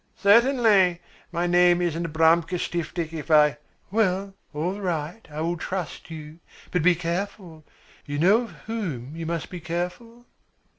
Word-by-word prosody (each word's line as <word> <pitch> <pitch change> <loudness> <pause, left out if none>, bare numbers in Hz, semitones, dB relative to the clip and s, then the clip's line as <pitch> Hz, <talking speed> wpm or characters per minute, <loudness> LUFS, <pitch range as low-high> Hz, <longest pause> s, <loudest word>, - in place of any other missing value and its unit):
"Certainly! 210 -5 +4 0.3
My 170 0 -1
name 175 0 +4
isn't 170 -1 -1
Abramka 165 +2 +3
Stiftik 165 -1 -3
if 160 0 -6
I 150 -1 +5 0.2
" - - -39
"Well, 195 -2 +1 0.2
all 175 +7 -3
right, 175 +2 -3
I 150 +1 -5
will 170 +2 -1
trust 180 -1 -5
you. 155 0 -9 0.3
But 180 - +1
be 180 +2 +5
careful. 175 -1 -4 0.4
You 145 0 -3
know 195 +9 +5
of - - -12
whom 160 - -4
you 165 -1 -5
must 170 -1 -3
be 180 - -6
careful?" 180 +9 -5
175 Hz, 150 wpm, -25 LUFS, 160-195 Hz, 0.4 s, I